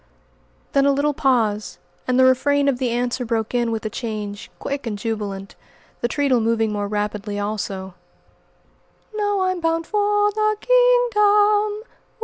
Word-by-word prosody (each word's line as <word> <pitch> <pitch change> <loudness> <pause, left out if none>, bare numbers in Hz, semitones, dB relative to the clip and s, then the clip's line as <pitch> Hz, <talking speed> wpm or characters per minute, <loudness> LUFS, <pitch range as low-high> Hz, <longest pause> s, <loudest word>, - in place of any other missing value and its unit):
Then 275 0 +4
a - - +5
little 285 +2 +1
pause, 225 -7 0 0.3
and 255 0 +1
the 260 - +6
refrain 280 +2 +3
of 265 -3 +1
the 255 -2 0
answer 245 +1 -1
broke 225 -1 -2
in 240 -1 +1
with 225 -1 -3
a - - -1
change, 210 -3 -5
quick 280 -3 -4
and 210 -2 -3
jubilant, 200 -2 -5 0.4
the 240 - 0
treadle 265 -2 +1
moving 225 -1 +1
more 205 -1 -2
rapidly, 210 0 -3
also: 200 -2 -4 1.2
"No, 410 -2 0
I'm 370 -1 0
bound 330 0 0
for 415 +1 +1
the 430 0 0
kingdom! 425 -4 +3
255 Hz, 145 wpm, -21 LUFS, -, 1.2 s, the